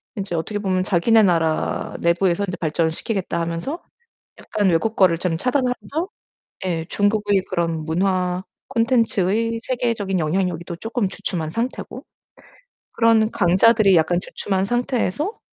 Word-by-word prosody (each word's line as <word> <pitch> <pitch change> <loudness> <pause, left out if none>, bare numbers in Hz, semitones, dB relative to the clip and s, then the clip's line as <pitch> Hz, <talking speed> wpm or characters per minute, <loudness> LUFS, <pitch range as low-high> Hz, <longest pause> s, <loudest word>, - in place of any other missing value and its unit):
인제 195 -4 -3
어떻게 205 +6 -2
보면 185 -2 0
자기네 210 +5 +4
나라 165 -4 0
내부에서 170 +2 +2
인제 180 - -4
발전시키겠다 170 +4 -1
하면서 170 - -3 0.6
약간 205 -2 -1
외국 185 +7 +1
거를 175 -4 +4
좀 175 -2 -1
차단하면서 265 - -1 0.6
예 165 -3 -1
중국의 205 -1 +1
그런 165 -2 -1
문화 180 +2 0 0.3
콘텐츠의 230 -3 +1
세계적인 230 -7 -1
영향력이 170 +1 -1
또 170 -1 -6
쪼끔 225 0 -2
주춤한 165 -5 -3
상태고 235 +7 -4 0.9
그런 225 -1 +3
강자들이 195 +1 +4
약간 175 +2 +2
주춤한 190 0 -2
상태에서 245 - -1
190 Hz, 320 characters per minute, -21 LUFS, 170-225 Hz, 0.9 s, 자기네